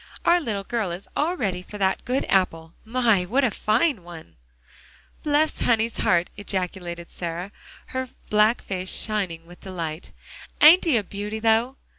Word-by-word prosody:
"Our 345 +1 +5
little 210 -8 -3
girl 220 -2 -2
is 175 +3 -7
all 340 +5 0
ready 185 - -1
for 210 +3 -10
that 190 -1 0
good 255 +2 0
apple. 165 -4 +1
My! 225 -4 +2
what 250 +10 +1
a 245 - +3
fine 220 - +1
one." 165 - -12 0.9
"Bless 300 +1 +1
honey's 230 -1 +1
heart!" 175 0 +2
ejaculated 180 -3 -4
Sarah, 175 +3 -5 0.4
her 260 0 -3 0.2
black 215 +2 +4
face 185 -1 -4
shining 185 -6 -2
with 175 +1 -15
delight. 170 -3 -5 0.5
"Ain't 330 +5 +8
he 305 -8 +4
a 215 - 0
beauty, 205 +2 -5
though?" 225 +3 +2
205 Hz, 155 wpm, -24 LUFS, 180-240 Hz, 0.9 s, Ain't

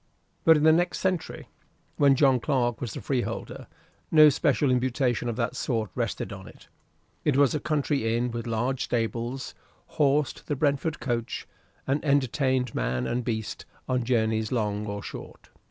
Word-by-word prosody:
But 160 -1 +7
in 150 - 0
the 160 - +7
next 175 +2 +2
century, 185 -3 -2 0.5
when 140 -2 +5
John 135 -2 +4
Clarke 120 -3 0
was 120 -5 -4
the - - -5
Freeholder, 130 -3 -3 0.4
no 155 -1 +8
special 140 -1 +2
imputation 125 -1 0
of 115 - -3
that 115 0 -2
sort 110 -6 -2
rested - - -3
on - - -10
it: - - -16 0.5
it 145 -3 +2
was 140 -2 +4
a 150 - 0
country 140 -6 0
inn 120 +1 -1
with 115 +1 -5
large 120 +4 -1
stables, 120 +2 -2 0.5
horsed 145 0 +1
the 145 - -1
Brentford 145 +2 0
coach, 120 -4 -3 0.4
and 140 +2 0
entertained 130 -3 +1
man 60 +1 -1
and 120 - -1
beast 110 -3 -4 0.2
on 125 -1 0
journeys 110 -3 0
long 105 -3 -1
or 100 0 -5
short. - - -10
125 Hz, 160 wpm, -26 LUFS, 115-145 Hz, 0.5 s, no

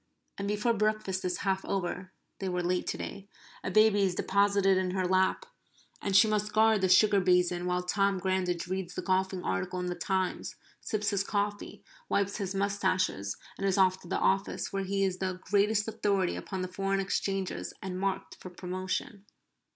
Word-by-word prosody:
And 200 - -2
before 210 +3 +1
breakfast 215 -3 0
is 180 -1 -1
half 190 0 +1
over 185 -1 -3 0.3
(they 195 - -2
were 180 -1 -1
late 180 +1 0
today), 200 0 -5 0.4
a - - -2
baby 215 -1 +5
is 190 -2 +1
deposited 200 0 +3
in 185 0 0
her 185 - +1
lap, 190 - +2 0.6
and 195 -1 -1
she 205 +3 +7
must 210 0 -1
guard 220 -1 +4
the 190 - +2
sugar 200 +2 +6
basin 180 -1 +2
while 180 0 0
Tom 195 +1 +1
Grandage 185 -2 -1
reads 185 -1 -4
the - - -4
golfing 190 -1 0
article 95 - -2
in 180 - -2
the 180 - -1
"Times," 185 +1 -2 0.3
sips 210 -2 -1
his 200 -1 +1
coffee, 205 0 -3 0.3
wipes 200 0 0
his 195 -2 -3
moustaches, 190 - 0 0.2
and 195 - 0
is 195 - +1
off 185 -1 +4
to - - -13
the - - -1
office, 195 +1 0
where 195 0 -1
he 195 +1 0
is 190 -1 0
the 185 -1 -2
greatest 210 +2 +2
authority 200 -4 0
upon 190 -2 -4
the - - -2
foreign 195 +1 -1
exchanges 195 0 -2
and 185 -1 -5
marked 195 0 -2
for 185 - -8
promotion. 185 +3 -4
190 Hz, 180 wpm, -30 LUFS, 185-200 Hz, 0.6 s, she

